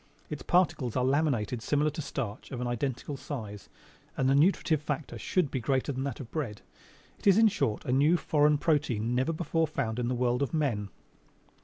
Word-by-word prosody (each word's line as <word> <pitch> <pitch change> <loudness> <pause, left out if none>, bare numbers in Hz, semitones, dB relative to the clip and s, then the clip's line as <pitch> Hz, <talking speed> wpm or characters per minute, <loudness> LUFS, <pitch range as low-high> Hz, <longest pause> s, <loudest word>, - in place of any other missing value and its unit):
Its 150 - -4
particles 165 -9 +1
are 125 -1 +2
laminated 130 -5 +1
similar 145 +4 +1
to 155 - -5
starch, 120 -7 -5
of 125 - -5
an 125 - -2
identical 125 +3 -3
size, 110 -8 -7 0.5
and 130 - +2
the 135 - +4
nutritive 160 0 +3
factor 150 0 -4
should 180 -7 0
be 130 - -1
greater 130 +4 0
than 130 0 -3
that 140 -4 -4
of 125 -5 -9
bread. 125 -10 -4 0.6
It - - -4
is, 195 0 +7
in 225 -1 +6
short, 110 - -1
a - - -1
new, 145 +6 +4
a - - +3
foreign 150 -2 +3
protein 125 -8 0
never 130 +5 +1
before 165 0 0
found 125 -6 -2
in 120 - -1
this 125 0 -1
world 125 +1 +1
of 140 +3 -1
men!" 115 -10 0
135 Hz, 200 wpm, -29 LUFS, 120-150 Hz, 0.6 s, is